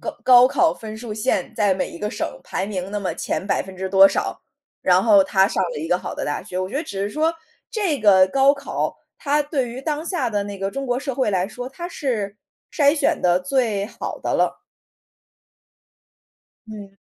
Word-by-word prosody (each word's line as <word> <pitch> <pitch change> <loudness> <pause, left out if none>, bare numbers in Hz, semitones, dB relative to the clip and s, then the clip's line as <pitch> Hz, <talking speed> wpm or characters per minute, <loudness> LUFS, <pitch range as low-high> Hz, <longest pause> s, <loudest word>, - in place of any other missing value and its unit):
高 - - -5
高 250 0 +8
考 335 +1 +3
分 220 -1 -8
数 225 -1 -7
线 210 -3 -1
在 205 -4 +2
每 185 - -3
一 170 - -10
个 210 0 -3
省 - - -2 0.2
排 190 - -3
名 190 -2 -4
那 205 - -2
么 195 - -2
前 - - -3
百 200 - +1
分 190 0 -11
之 190 +1 -3
多 195 0 +7
少， - - -3 0.4
然 185 +1 +4
后 205 -4 +6
他 190 0 +3
上 190 - -1
了 - - -4
一 160 - -4
个 180 +1 +2
好 - - -6
的 - - -4
大 145 - -3
学。 180 - -6
我 185 0 -2
觉 - - -10
得 300 - -1
只 200 - -6
是 205 - -2
说， 320 +4 0 0.4
这 390 - -1
个 190 -3 +6
高 275 +5 +4
考， 280 - -3 0.2
它 290 +1 +1
对 280 -4 -2
于 250 +3 -7
当 305 +1 -2
下 315 -10 -1
的 205 -1 0
那 200 -1 -7
个 195 0 -2
中 275 +3 -4
国 245 +1 0
社 275 -2 -4
会 255 -5 +1
来 185 -1 0
说， 245 +4 -7
它 345 +6 -7
是 225 - -3 0.4
筛 285 -3 +4
选 310 - +1
得 180 0 +3
最 205 0 0
好 215 - -6
的 - - -1
了。 - - 0 2.1
嗯。 205 -2 -10
215 Hz, 230 characters per minute, -22 LUFS, 195-275 Hz, 2.1 s, 高